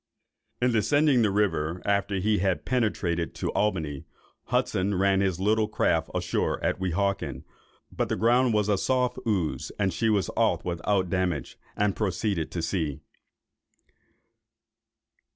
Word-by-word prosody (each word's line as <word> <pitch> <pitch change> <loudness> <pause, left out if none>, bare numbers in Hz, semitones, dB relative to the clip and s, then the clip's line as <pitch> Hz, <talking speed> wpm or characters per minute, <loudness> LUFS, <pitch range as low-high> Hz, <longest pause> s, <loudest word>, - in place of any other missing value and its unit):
In 125 0 +2
descending 140 +4 +3
the 110 - +3
river, 90 -5 0
after 100 0 +1
he 105 +2 +1
had 95 -1 0
penetrated 100 -9 -1
to - - -2
Albany, 80 -9 -1 0.4
Hudson 95 +2 0
ran 95 +1 +3
his 95 -3 0
little 105 +2 +2
craft 110 - +1
ashore - - -1
at - - 0
Weehawken; 95 -7 -1 0.5
but - - -2
the - - 0
ground 120 +2 +3
was 105 -1 +2
a 100 -2 +2
soft 125 -1 0
ooze, 95 -8 -1
and 95 -3 0
she 110 +7 +1
was 100 -5 +2
got - - -2
off - - +1
without 90 +1 0
damage, 90 -5 -1 0.2
and 105 -1 +1
proceeded 95 -4 -1
to 85 - -4
sea. 80 -5 -2
100 Hz, 140 wpm, -27 LUFS, 90-105 Hz, 0.5 s, descending